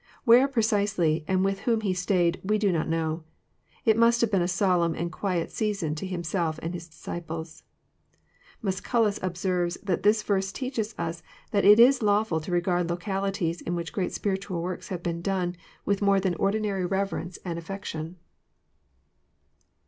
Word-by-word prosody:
Where 245 +3 +7
precisely, 205 - +1
and 190 0 +2
with 195 0 0
whom 225 +1 +1
he 195 -3 0
stayed, 180 -1 +1
we 210 +3 +1
do 205 -2 +2
not 165 -3 0
know. 160 0 -1 0.6
It 220 - +5
must 230 +1 +4
have 230 -2 +2
been 195 -3 +3
a 175 - +1
solemn 180 -3 +2
and 170 +1 -3
quiet 180 -3 -2
season 200 -8 -1
to 160 +5 -5
Himself 170 -2 -2
and 165 +2 -3
His 170 -1 -7
disciples. 160 0 -7 1.0
Musculus 210 +2 +1
observes 180 -1 -1
that 190 -3 0
this 210 +2 +3
verse 195 -2 0
teaches 230 -3 -3
us 165 0 -3 0.3
that 200 -2 +2
it 210 +2 +8
is 255 +3 +7
lawfhl 205 -6 +2
to 165 - -6
regard 175 0 +1
localities 190 -1 -2
in 175 - -3
which 165 -3 -4
great 185 - -1
spiritual 190 -3 -2
works 180 0 -4
have 175 -2 -5
been 170 -1 -2
done 180 -1 -1 0.3
with 200 0 +1
more 200 -1 +4
than 190 -2 0
ordinary 200 0 0
reverence 185 -1 -2
and 170 -2 -3
afibction. 170 -2 -6
185 Hz, 165 wpm, -27 LUFS, 170-205 Hz, 1.0 s, it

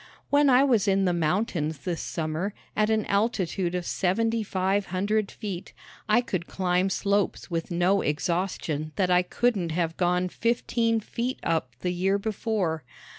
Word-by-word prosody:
When 285 0 +5
I 255 +1 +6
was 230 -7 +3
in 195 0 +3
the 180 - +2
mountains 165 -2 0
this 165 +4 -3
summer, 165 +5 -3 0.2
at 215 0 +2
an 220 -1 +1
altitude 195 -4 0
of 180 -1 -2
seventy 225 +7 +1
five 195 0 0
hundred 200 +3 0
feet, 195 -5 -6 0.4
I 215 +3 +5
could 185 -7 -3
climb 185 0 +1
slopes 200 -1 0
with 165 -1 -2
no 180 +3 +2
exhaustion 155 -1 -1
that 185 -2 +1
I 180 0 +5
couldn't 195 -2 0
have 165 -1 -1
gone 180 0 +2
fifteen 230 +1 0
feet 245 +4 -3
up 155 -8 -1
the 180 -1 -1
year 190 +3 +1
before. 200 - -1
190 Hz, 155 wpm, -26 LUFS, 175-215 Hz, 0.4 s, I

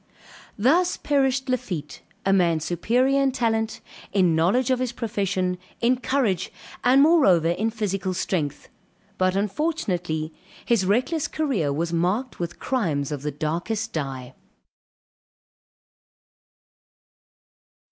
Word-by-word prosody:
_] - - -36 0.5
Thus 340 - +3
perished 270 -2 +1
Lafitte, 175 - -3 0.2
a 195 - +3
man 170 -4 +3
superior 245 - +1
in 270 -1 +2
talent, 225 -3 -1 0.3
in 185 -5 +3
knowledge 230 +11 +2
of 255 - +2
his 255 -1 -2
profession, 195 -5 -1 0.2
in 245 +2 +3
courage, 235 -9 0 0.3
and 260 +3 +6
moreover 200 - +5
in 210 +6 0
physical 195 -4 -2
strength; 155 -6 -2 0.5
but 185 0 +2
unfortunately 190 - -1 0.3
his 215 -6 +2
reckless 255 - +1
career 250 - -1
was 165 +4 -2
marked 190 +10 -1
with 175 0 -4
crimes 160 - -1
of 145 -2 -4
the 150 - -2
darkest 175 +10 -3
dye. 135 -4 -4
200 Hz, 115 wpm, -24 LUFS, 170-255 Hz, 0.5 s, and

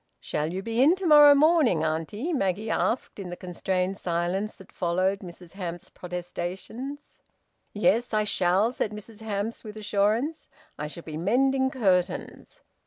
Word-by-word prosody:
"Shall 150 +2 -2
you 190 +2 -4
be 230 +2 0
in 310 +7 +6
to 380 0 -6
morrow 295 -2 +8
morning, 290 - +4
auntie?" 165 - -2
Maggie 210 - -1
asked, 235 -2 -1
in 190 -2 -6
the 175 - -5
constrained 185 +1 -2
silence 175 +4 -1
that 190 - -16
followed 185 +3 0
Mrs 175 -2 -11
Hamps's 175 -3 -7
protestations. 180 +10 -6 0.5
"Yes, 225 +3 +2
I 215 -1 +2
shall," 195 +2 +2
said 215 -4 -2
Mrs 210 +1 -10
Hamps, 215 +1 -3
with 215 -1 -9
assurance. 215 +8 0 0.3
"I 150 - -4
shall 165 +2 -9
be 155 -1 -6
mending 265 +9 +2
curtains." 195 - -1
200 Hz, 150 wpm, -26 LUFS, 180-240 Hz, 0.5 s, morrow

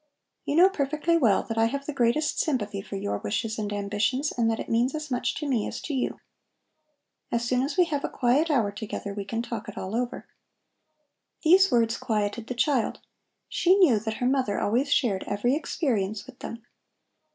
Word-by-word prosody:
You 290 - -1
know 355 +3 +8
perfectly 305 -1 0
well 235 -12 +3
that 225 -1 -3
I 225 - +5
have 275 +4 -2
the 300 - -4
greatest 265 +4 +1
sympathy 210 -9 -1
for 195 - -8
your 100 - -2
wishes 220 - -2
and 210 -1 -3
ambitions, 210 +8 0
and 230 -2 +2
that 225 - -1
it - - -5
means 240 +5 +1
as 305 -2 -5
much 245 0 0
to 300 - -4
me 245 -6 0
as - - -5
to 305 - -5
you. 260 - -2 1.1
As 235 0 0
soon 250 +1 +1
as 280 +7 -2
we 360 - +6
have 290 -4 -2
a - - -1
quiet 265 +7 +2
hour 235 -9 +2
together 205 -1 -5
we 200 -1 -5
can 230 +3 -3
talk 225 -3 -5
it 210 - -10
all 190 +4 -4
over." 245 0 -3 1.2
These 375 +4 +6
words 230 -1 +2
quieted 215 +1 -2
the 250 - -4
child. 255 -2 +1 0.5
She 365 +2 +3
knew 330 - +5
that 220 +1 -4
her 245 - -2
mother 255 -6 +1
always 255 +7 +1
shared 220 -11 +2
every 205 +5 +1
experience 220 - -1
with 265 -2 -14
them. 230 +1 -8
240 Hz, 195 wpm, -26 LUFS, 215-280 Hz, 1.2 s, know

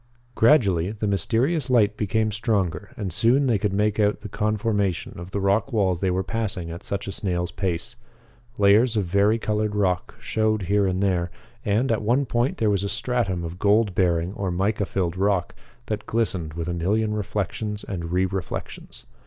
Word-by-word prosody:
Gradually 100 - +4
the 105 0 -4
mysterious 125 - +1
light 105 -5 +4
became 110 +1 0
stronger 105 -5 -1
and 95 -6 -3
soon 125 - +3
they 115 -6 +2
could 105 0 0
make 105 +2 +1
out 105 0 +2
the 105 - -7
conformation 105 -3 -1
of 85 +1 -8
the 100 - -2
rock 100 +6 +1
walls 95 -6 +1
they 95 - +1
were 90 +1 0
passing 100 -6 -3
at 85 +2 -7
such 100 - -4
a 100 - -4
snail's 90 -2 -2
pace. 95 +5 -2 0.6
Layers 110 +4 +4
of 105 - +2
vari 100 +5 +3
colored 105 -1 -1
rock 95 -4 0
showed 110 -2 0
here 100 +2 +2
and 95 +1 0
there, 90 -3 +1 0.3
and, 110 +6 +1
at 115 - +1
one 125 +6 +2
point 120 +2 0
there 110 -2 +2
was 100 -1 0
a 100 - -2
stratum 110 -4 -1
of 85 +2 -6
gold 105 0 +3
bearing 85 -1 +1
or 100 -2 -3
mica 100 +3 0
filled 90 -3 -1
rock 95 -2 +1 0.3
that 105 -2 -4
glistened 90 -9 -1
with 85 0 -4
a 90 - -1
million 105 +6 0
reflections 105 0 -3
and 85 -4 -5
re 90 +1 +2
reflections. 95 -1 -6
100 Hz, 185 wpm, -24 LUFS, 95-110 Hz, 0.6 s, Gradually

